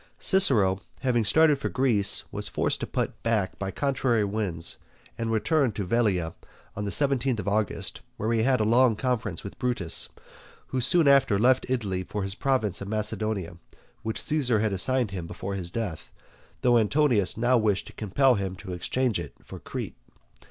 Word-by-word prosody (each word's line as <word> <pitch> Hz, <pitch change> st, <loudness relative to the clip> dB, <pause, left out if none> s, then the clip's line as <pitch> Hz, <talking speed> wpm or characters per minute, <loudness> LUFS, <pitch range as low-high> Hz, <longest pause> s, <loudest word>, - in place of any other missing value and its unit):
Cicero 110 Hz, -, +4 dB, 0.2 s
having 125 Hz, -3 st, +1 dB
started 150 Hz, +7 st, +4 dB
for -, -, -2 dB
Greece 115 Hz, -7 st, +1 dB
was -, -, -2 dB
forced -, -, -1 dB
to -, -, -4 dB
put -, -, -3 dB
back 110 Hz, -5 st, -1 dB
by 95 Hz, -, -3 dB
contrary 130 Hz, -2 st, 0 dB
winds, 100 Hz, -5 st, -1 dB, 0.4 s
and 115 Hz, -1 st, -3 dB
returned 125 Hz, +2 st, +1 dB
to 100 Hz, -, -3 dB
Velia 95 Hz, -6 st, 0 dB, 0.4 s
on 105 Hz, -, -4 dB
the 100 Hz, -, -3 dB
seventeenth 135 Hz, -3 st, +1 dB
of 100 Hz, -, -5 dB
August, 105 Hz, 0 st, -1 dB, 0.2 s
where 110 Hz, +2 st, -1 dB
he 115 Hz, -, +2 dB
had 130 Hz, +1 st, +2 dB
a -, -, +2 dB
long 115 Hz, +1 st, +4 dB
conference 115 Hz, -7 st, -2 dB
with 100 Hz, -, -9 dB
Brutus, 120 Hz, -10 st, -1 dB, 0.6 s
who 130 Hz, -, -1 dB
soon 155 Hz, +5 st, +4 dB
after 140 Hz, -7 st, +5 dB
left 125 Hz, +4 st, +2 dB
Italy 105 Hz, -8 st, -1 dB
for 105 Hz, +2 st, -4 dB
his 95 Hz, 0 st, -1 dB
province 110 Hz, -7 st, 0 dB
of 100 Hz, -, -5 dB
Macedonia, 105 Hz, -4 st, -2 dB, 0.4 s
which 110 Hz, 0 st, -3 dB
Caesar 130 Hz, -7 st, +2 dB
had 110 Hz, -1 st, 0 dB
assigned 120 Hz, +3 st, +1 dB
him 90 Hz, -4 st, -5 dB
before 100 Hz, +3 st, -6 dB
his 90 Hz, -3 st, -4 dB
death, 95 Hz, -5 st, -5 dB, 0.5 s
though 120 Hz, -1 st, +4 dB
Antonius 115 Hz, -4 st, +2 dB
now 120 Hz, +2 st, +3 dB
wished 105 Hz, -3 st, 0 dB
to -, -, -12 dB
compel 125 Hz, +6 st, +2 dB
him 95 Hz, -4 st, -3 dB
to 95 Hz, -1 st, -8 dB
exchange 120 Hz, +6 st, -1 dB
it -, -, -7 dB
for -, -, -10 dB
Crete. -, -, -6 dB
110 Hz, 175 wpm, -26 LUFS, 100-130 Hz, 0.6 s, after